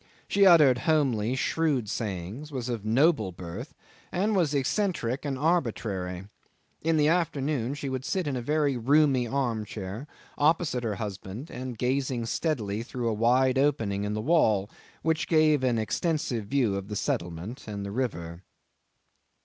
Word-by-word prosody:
She 200 -1 +5
uttered 150 -8 +7
homely 130 -7 +2
shrewd 140 -3 0
sayings, 105 - -4
was 125 -3 -4
of 115 -4 -3
noble 115 - +3
birth, 90 - -8 0.4
and 205 +4 +1
was 160 -6 +2
eccentric 140 - -1
and 135 -2 -2
arbitrary. 110 - -1 0.6
In 165 0 +2
the 150 -1 +4
afternoon 145 -6 0
she 140 -1 -5
would 130 -1 -3
sit 185 +4 -1
in 145 -2 -2
a 125 - -2
very 145 +1 +1
roomy 135 0 +3
arm 120 -4 -1
chair, 105 +5 -6 0.3
opposite 150 -4 +2
her 110 -3 -1
husband, 105 - -6 0.3
gazing 130 -1 -1
steadily 115 -6 -1
through 120 0 -3
a - - 0
wide 125 +4 +3
opening 110 -9 +1
in 105 +1 -2
the 110 - -2
wall 110 - +2 0.3
which 160 0 0
gave 155 -4 +4
an 125 -3 +2
extensive 125 - -1
view 120 -5 +1
of 100 0 -6
the 105 - -5
settlement 90 - -3
and 100 -2 -5
the 100 - -5
river. 85 -8 -3
125 Hz, 150 wpm, -27 LUFS, 105-150 Hz, 0.6 s, uttered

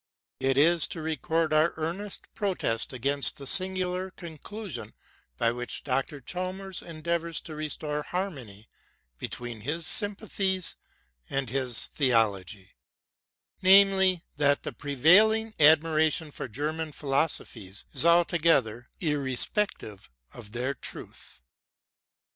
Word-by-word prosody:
It 135 0 +1
is 165 +2 +4
to - - -7
record 160 0 -1
our 155 +2 +3
earnest 175 +6 -5
protest 180 - -2
against 140 +4 +1
the 140 - -9
singular 185 +3 +2
conclusion 185 +3 -8 0.4
by 115 - +2
which 125 +1 -5
Dr. 135 +2 -2
Chalmers 185 +5 -5
endeavours 170 0 -3
to 160 - -9
restore 150 0 -4
harmony 135 - -6 0.5
be - - -4
tween 120 -3 -7
hifl 155 +8 -3
sympathies 195 -1 -1 0.5
and 135 -4 -2
his 130 -3 0
theology; 105 - 0 0.5
— - - -44
namely, 190 -2 +6
that 145 -1 +3
the - - -5
prevailing 205 - +3
admiration 155 0 +4
for 140 - -6
German 150 +6 -4
philosophies 135 -9 -2
is - - +7
altoge 170 -3 +4
ther 115 +3 -10 0.9
five 100 - -11 0.2
of 110 -4 -11
their 125 +3 -1
truth. 65 - -10
155 Hz, 115 wpm, -27 LUFS, 130-180 Hz, 0.9 s, is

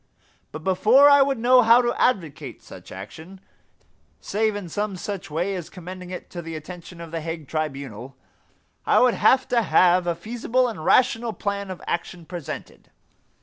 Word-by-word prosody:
But 155 +1 -8
before 220 - +5
I 285 0 +7
would 275 -1 +2
know 250 +2 +5
how 235 +1 +6
to 240 - 0
advocate 175 - -1
such - - -13
action, 160 - -10 0.8
save 215 0 -1
in 205 -3 -5
some 205 +4 -3
such 195 0 -6
way 175 +6 -2
as 180 -4 -6
commending 180 0 -9
it 180 - -8
to 175 - -6
the 165 -1 -7
attention 170 +2 -10
of 165 -1 -9
The 165 -1 -4
Hague 165 -2 -6
Tribunal, 135 -5 -5 0.7
I - - +2
would 250 -1 +5
have 260 0 +3
to 240 -1 +3
have 180 -3 +3
a 170 - 0
feasible 240 +5 -1
and 215 -9 -6
rational 235 0 +2
plan 200 -1 -4
of 185 - -8
action 170 0 -4
presented. 170 -3 -8
185 Hz, 170 wpm, -23 LUFS, 165-225 Hz, 0.8 s, I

